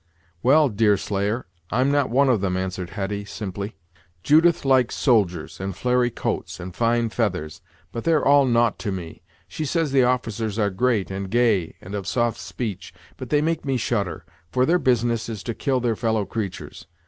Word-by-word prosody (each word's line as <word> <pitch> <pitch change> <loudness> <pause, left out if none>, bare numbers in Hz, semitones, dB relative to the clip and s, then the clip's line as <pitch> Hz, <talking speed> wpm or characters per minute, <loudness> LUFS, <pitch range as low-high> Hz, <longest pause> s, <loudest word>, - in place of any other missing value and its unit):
"Well, 145 +4 +5
Deerslayer, 105 +1 0 0.2
I'm 130 +5 +2
not 145 -2 +2
one 135 +3 +3
of 120 -6 +2
them," 95 -2 0
answered 95 -1 -3
Hetty, 100 0 -3
simply; 100 0 -6 0.5
"Judith 165 +1 +4
likes 130 -2 +3
soldiers, 95 - +1
and 95 -1 -4
flary 125 0 +1
coats, 110 - -4
and 90 0 -8
fine 115 0 +1
feathers; 90 -10 -2 0.3
but 115 - -5
they're 160 -3 +2
all 140 0 +6
naught 120 -2 +2
to 105 - -3
me. 85 -4 -7 0.3
She 155 - -5
says 160 0 0
the 135 -1 +4
officers 115 -4 0
are 105 -2 +1
great, 105 -1 0
and 95 0 -4
gay, 110 -7 +2
and 95 - -9
of 100 -2 -4
soft 120 0 0
speech; 110 -7 -6 0.2
but - - -7
they 150 0 +2
make 165 0 -1
me 135 -2 0
shudder, 105 -5 -2 0.3
for 130 0 +2
their 175 +4 +3
business 120 -4 +1
is 110 -4 -6
to 115 - -3
kill 135 +2 0
their 120 -2 0
fellow 110 -2 0
creatures. 100 -1 -6
115 Hz, 180 wpm, -23 LUFS, 100-130 Hz, 0.5 s, all